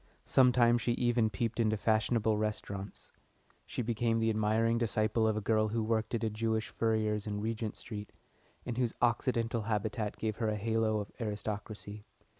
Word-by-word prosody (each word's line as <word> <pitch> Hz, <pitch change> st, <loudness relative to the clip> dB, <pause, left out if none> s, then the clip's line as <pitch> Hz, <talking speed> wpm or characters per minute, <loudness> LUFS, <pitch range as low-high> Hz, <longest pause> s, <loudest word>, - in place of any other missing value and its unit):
Sometimes 120 Hz, -2 st, +4 dB
she 120 Hz, -, +1 dB
even 120 Hz, -2 st, +2 dB
peeped 115 Hz, +3 st, -2 dB
into 110 Hz, -1 st, +2 dB
fashionable 110 Hz, +1 st, +2 dB
restaurants. 105 Hz, -2 st, -4 dB, 0.6 s
She -, -, -3 dB
became 115 Hz, 0 st, +1 dB
the 115 Hz, 0 st, +2 dB
admiring 110 Hz, +2 st, +2 dB
disciple 110 Hz, 0 st, +1 dB
of 110 Hz, -1 st, +1 dB
a -, -, -1 dB
girl 110 Hz, +1 st, +2 dB
who 110 Hz, +1 st, -1 dB
worked 110 Hz, +1 st, 0 dB
at 115 Hz, -, -2 dB
a 110 Hz, -, +1 dB
Jewish 110 Hz, +1 st, -1 dB
furrier's 110 Hz, -2 st, 0 dB
in 105 Hz, -1 st, -2 dB
Regent 110 Hz, 0 st, -3 dB
Street, 105 Hz, -2 st, -7 dB, 0.5 s
and 120 Hz, 0 st, -3 dB
whose 120 Hz, -3 st, 0 dB
occidental 120 Hz, -1 st, +1 dB
habitat 105 Hz, 0 st, -2 dB
gave 110 Hz, -1 st, -2 dB
her 115 Hz, -2 st, 0 dB
a 105 Hz, -, 0 dB
halo 110 Hz, 0 st, +1 dB
of 100 Hz, -, -8 dB
aristocracy. 105 Hz, -1 st, -5 dB
110 Hz, 165 wpm, -32 LUFS, 105-115 Hz, 0.6 s, Sometimes